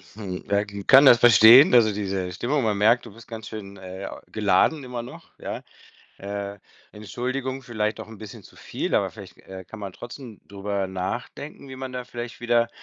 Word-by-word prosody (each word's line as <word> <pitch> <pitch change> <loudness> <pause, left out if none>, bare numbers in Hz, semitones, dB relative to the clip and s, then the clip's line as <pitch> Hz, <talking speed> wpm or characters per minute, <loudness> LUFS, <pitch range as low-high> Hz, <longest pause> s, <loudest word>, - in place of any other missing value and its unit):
Hm, 95 -4 -6
ja 100 +1 +2
gl 100 -1 -8
kann 135 +1 +8
das 120 -3 +8
verstehen, 120 - +8
also, 110 -3 +6
diese 95 -3 -3
Stimmung. 125 +9 -1
Man 105 -2 0
merkt, 115 +4 +3
du 110 - -12
bist 115 +1 -15
ganz 110 -2 -8
schön, 100 -2 -9
äh, 95 +1 -8 0.2
geladen 110 +8 +2
immer 125 -2 -6
noch, 120 - -12
ja? - - -6 0.6
Äh, 100 0 -6 0.3
Entschuldigung, 130 +6 -4
vielleicht 110 -3 -3
auch - - -9
'n 110 - -12
bisschen 110 -2 -10
zu - - -18
viel, - - -4
aber - - +1
vielleicht, - - -13
äh, 95 0 -10
kann 110 - -11
man 100 -2 -7
trotzdem 120 0 -10
drüber 100 -1 -3
nachdenken, 120 +9 -6
wie 130 - -9
man 130 -1 -6
da 125 -1 -5
vielleicht 120 -1 -8
wieder 120 -1 +2
110 Hz, 190 wpm, -24 LUFS, 100-120 Hz, 0.6 s, kann